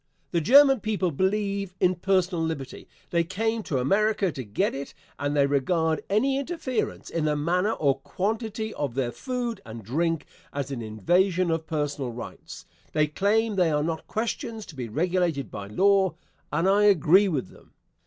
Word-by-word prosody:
The 170 - +1
German 270 - +7
people 205 -5 -1
believe 195 +2 -1
in 185 0 +4
personal 185 -1 +1
liberty. 160 -5 -5 0.2
They 170 -1 +3
came 220 +6 -1
to 150 -9 -2
America 200 +7 +2
to 135 -3 -6
get 120 - -1
it, 140 +1 -6 0.2
and 145 +1 -1
they 140 - +5
regard 160 +3 +1
any 265 +7 +2
interference 280 -5 -3
in 165 -2 -1
the 150 -1 +1
manner 180 +8 +1
or 140 -7 +1
quantity 220 - -3
of 140 -5 -3
their 130 -3 0
food 240 - -4
and 110 0 -9
drink 165 - -1 0.3
as 140 -1 -4
an 130 -3 -4
invasion 175 - +1
of 165 0 -2
personal 145 -4 -2
rights. 120 +1 -9 0.3
They 155 -1 +3
claim 205 +7 +1
they 180 -3 +4
are 150 -1 +1
not 160 0 -3
questions 225 0 -3
to 160 - -12
be 125 -4 -5
regulated 165 - 0
by 100 - -6
law, 190 - +3 0.4
and 170 - +1
I 205 +2 +4
agree 195 0 +5
with 140 - -2
them. - - -20
175 Hz, 170 wpm, -26 LUFS, 145-205 Hz, 0.4 s, German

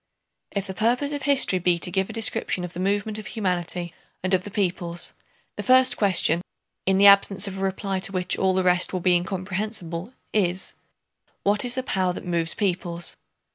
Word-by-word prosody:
If 200 -1 -3
the 190 - -6
purpose 245 +8 +1
of 290 -1 -4
history 270 -9 +3
be 175 0 +2
to 175 - -1
give 190 0 0
a - - -5
description 220 -5 -1
of 180 0 -6
the 175 - -7
movement 205 +3 -1
of 215 - -8
humanity 180 -4 -2 0.3
and 185 +1 -1
of 185 -1 +2
the - - -6
peoples, 175 -3 -2 0.4
the - - -2
first 255 -1 +6
question—in 185 0 0
the 200 - +5
absence 200 0 +5
of 195 -1 -6
a - - -5
reply 195 0 -2
to 195 +1 0
which 180 -1 0
all 190 -1 +1
the 185 - +2
rest 180 0 +2
will 185 - -1
be 180 +1 +3
incomprehensible—is: 185 +1 -3 0.7
what 205 +1 +2
is 245 0 +1
the 260 - -2
power 185 -6 0
that - - -8
moves 170 -2 0
peoples? 175 -4 -2
190 Hz, 185 wpm, -24 LUFS, 180-205 Hz, 0.7 s, first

